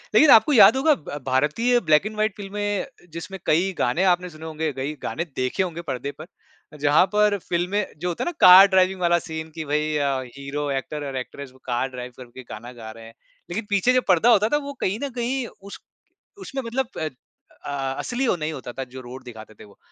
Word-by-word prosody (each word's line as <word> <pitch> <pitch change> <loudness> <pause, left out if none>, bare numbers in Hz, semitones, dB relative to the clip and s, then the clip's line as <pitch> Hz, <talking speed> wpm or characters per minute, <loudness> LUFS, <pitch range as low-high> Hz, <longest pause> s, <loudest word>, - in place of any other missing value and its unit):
लेकिन 310 - +7
आपको 225 +7 +6
याद 235 - +8
होगा 300 +3 +4
ब 145 -3 -8
भारतीय 150 - +2
ब्लैक 155 -2 +3
एंड 215 0 -5
वाइट 215 -1 0
फ़िल्में 205 0 -3
अ, - - -10 0.3
जिसमें 190 +3 -7
कई 180 +5 +2
गाने 180 - +1
आपने 180 -1 +2
सुने 160 0 -11
होंगे, 160 -1 -3
कई 135 +3 -4
गाने 170 - -3
देखे 130 +9 0
होंगे 170 -2 -5
पर्दे 140 -3 -4
पर, 155 - -8 0.5
जहाँ 145 +4 +4
पर 210 -1 +3
फ़िल्में 180 +4 0
जो 180 - -3
होता 170 - -3
है - - -3
ना - - -4
कार 185 +2 +10
ड्राइविंग 190 0 +2
वाला 175 0 +3
सीन 160 -1 -7
कि 160 -1 -5
भई 150 +1 -1
अ, 140 -2 0 0.2
हीरो, 145 +1 -4
एक्टर 145 +2 -4
और 135 - -6
एक्ट्रेस 130 +1 -7
वो 130 - -21
कार 125 +1 -1
ड्राइव 125 -1 -8
करके 125 0 -11
गाना 120 +3 -8
गा 110 -2 -9
रहे 115 0 -12
हैं। 115 - -13 0.4
लेकिन 205 +5 -4
पीछे 205 +5 +3
जो 255 - +3
पर्दा 190 +6 +4
होता 215 -1 +4
था 295 - +5
वो 285 - -5
कहीं 200 +5 -1
न 280 - -2
कहीं 250 +1 -1 0.2
उस 200 +1 -10 0.6
उसमें 275 -7 -5
मतलब 245 +2 -2
प - - -3
अ 155 -1 -2 0.6
अ, 135 -2 -3
असली 250 +1 -2
वो 190 - +2
नहीं 155 -1 -4
होता 130 -4 -7
था 135 - -4
जो 130 0 -8
रोड 130 +1 -10
दिखाते 110 -3 -11
थे - - -11
वो। 100 - -19
160 Hz, 225 wpm, -23 LUFS, 135-205 Hz, 0.6 s, कार